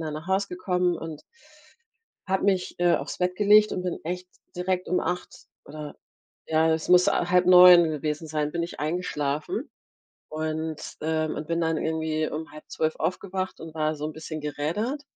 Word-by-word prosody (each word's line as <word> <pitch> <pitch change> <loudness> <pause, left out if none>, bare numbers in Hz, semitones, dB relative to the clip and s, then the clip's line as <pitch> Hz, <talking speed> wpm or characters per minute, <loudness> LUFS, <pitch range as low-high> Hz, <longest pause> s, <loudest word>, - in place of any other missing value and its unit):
dann 155 -2 -4
nach 155 +2 -7
Hause 190 +1 0
gekommen 180 -1 0
und 155 -2 -7 1.1
habe 190 0 0
mich, 190 -2 0
äh, 175 -1 +4
auf's - - -5
Bett 180 0 0
gelegt 210 +1 +5
und 180 - -3
bin 180 -2 -3
echt 180 +2 -4 0.3
direkt 180 0 -1
um 180 - +2
8:00 180 +1 -4 0.2
oder 150 0 -8 0.5
ja, 160 0 +3
es 160 -1 -2
muss 180 +2 +6
a 175 -3 +1
8:30 180 -2 +8
gewesen 150 +1 -3
sein, 150 -1 -2
bin 170 - -1
ich 170 - -6
eingeschlafen 150 -2 -2 0.6
und 155 0 -3 0.2
ähm, 155 0 -1
und 150 - -5
bin 170 0 0
dann 165 -1 +1
irgendwie 160 -1 -1
um 160 +1 -6
11:30 155 +1 -3
aufgewacht 185 +1 -3
und 160 -1 -9
war 155 0 0
so 150 - -6
'n 155 - -5
bisschen 155 0 -7
gerädert 170 - -3
165 Hz, 170 wpm, -26 LUFS, 155-180 Hz, 1.1 s, 8:30